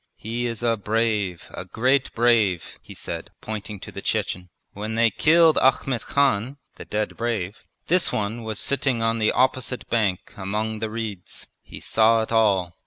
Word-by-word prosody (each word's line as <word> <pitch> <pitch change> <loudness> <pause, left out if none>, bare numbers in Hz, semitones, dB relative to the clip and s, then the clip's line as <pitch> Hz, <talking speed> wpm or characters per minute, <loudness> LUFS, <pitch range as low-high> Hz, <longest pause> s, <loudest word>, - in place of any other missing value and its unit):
He 120 +3 -3
is 115 0 -5
a 115 -1 +2
brave, 105 -4 -1
a - - -5
great 130 +4 +1
brave!' 115 -7 +2
he - - -12
said, - - -6
pointing 105 -1 -6
to - - -8
the - - -7
Chechen. 90 0 -2 0.2
'When 110 +2 -4
they 115 0 +4
killed 165 0 +5
Ahmet 130 -2 +2
Khan 135 -2 +1 0.2
(the - - -9
dead 105 0 -2
brave) 110 -4 -2 0.3
this 180 +1 +3
one 110 +3 -2
was 110 -2 -5
sitting 135 -3 0
on 115 0 +1
the 110 - +3
opposite 130 -1 0
bank 105 -6 0
among 105 +3 -2
the 110 0 -2
reeds. 110 -5 -5 0.2
He - - -11
saw 110 0 +3
it 110 - -7
all. 100 -6 +2
110 Hz, 170 wpm, -24 LUFS, 105-120 Hz, 0.3 s, killed